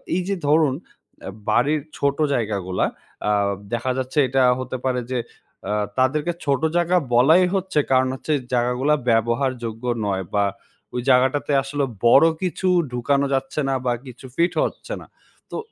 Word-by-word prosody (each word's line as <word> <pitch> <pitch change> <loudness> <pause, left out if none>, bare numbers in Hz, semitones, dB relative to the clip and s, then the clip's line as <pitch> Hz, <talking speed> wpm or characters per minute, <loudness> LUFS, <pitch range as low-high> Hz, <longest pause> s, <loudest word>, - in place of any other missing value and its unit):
এই 185 - +1
যে 200 - 0
ধরুন 150 -2 +4 0.5
অ্যা - - -7 0.2
বাড়ির 145 +4 +2 0.2
ছোট 140 0 0 0.2
জায়গাগুলা, 100 -7 -1 0.4
আ - - +3 0.4
দেখা 120 +2 0
যাচ্ছে 130 +3 -4
এটা 135 +1 +1 0.2
হতে 130 0 -4
পারে 125 -1 0
যে 125 - 0 0.5
আ - - 0 0.3
তাদেরকে 150 +6 +1
ছোট 140 -1 +1 0.2
জায়গা 175 +1 +2 0.2
বলাই 155 +10 +6
হচ্ছে 190 -4 0
কারণ 130 0 +4
হচ্ছে, 155 +3 -2 0.2
জায়গাগুলা 125 +4 +2 0.2
ব্যবহারযোগ্য 115 0 0 0.2
নয় 95 -2 -1
বা 100 - +3 0.5
ওই 125 - -1
জায়গাটাতে 130 +3 +3
আসলে 140 0 -1 0.2
বড় 135 +6 +7 0.2
কিছু 185 0 -2 0.2
ঢুকানো 140 +3 +1
যাচ্ছে 135 +2 -2
না - - +1
বা 125 - +2
কিছু 125 0 -11
ফিটও 170 +1 +1
হচ্ছে - - -8
না। - - -12 0.5
তো - - -4
130 Hz, 155 wpm, -22 LUFS, 120-150 Hz, 0.5 s, বড়